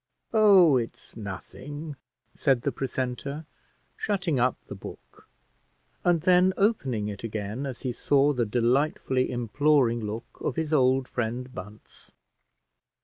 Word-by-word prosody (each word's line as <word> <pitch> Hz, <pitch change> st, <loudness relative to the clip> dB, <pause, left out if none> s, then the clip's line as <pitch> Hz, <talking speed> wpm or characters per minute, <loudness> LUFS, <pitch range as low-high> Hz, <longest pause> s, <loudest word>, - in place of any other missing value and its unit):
"Oh! 195 Hz, -, +7 dB
it's 115 Hz, -2 st, -6 dB
nothing," 140 Hz, -, -7 dB, 0.4 s
said 130 Hz, -4 st, +1 dB
the -, -, 0 dB
precentor, 135 Hz, +3 st, -4 dB, 0.5 s
shutting 180 Hz, -, -1 dB
up 125 Hz, +1 st, +2 dB
the -, -, -8 dB
book -, -, -12 dB, 0.7 s
and 175 Hz, -2 st, +3 dB
then 180 Hz, +2 st, +4 dB
opening 135 Hz, -, +1 dB
it 105 Hz, 0 st, -6 dB
again 110 Hz, +4 st, -4 dB
as 130 Hz, -3 st, -7 dB
he 130 Hz, -, -2 dB
saw 145 Hz, +4 st, +2 dB
the 125 Hz, -3 st, +1 dB
delightfully 130 Hz, +3 st, +1 dB
imploring 125 Hz, +1 st, +2 dB
look 110 Hz, +1 st, -6 dB
of -, -, -1 dB
his 160 Hz, -2 st, -2 dB
old 130 Hz, -2 st, +3 dB
friend 125 Hz, +2 st, -3 dB
Bunce. 105 Hz, +3 st, -10 dB
130 Hz, 125 wpm, -27 LUFS, 120-150 Hz, 0.7 s, Oh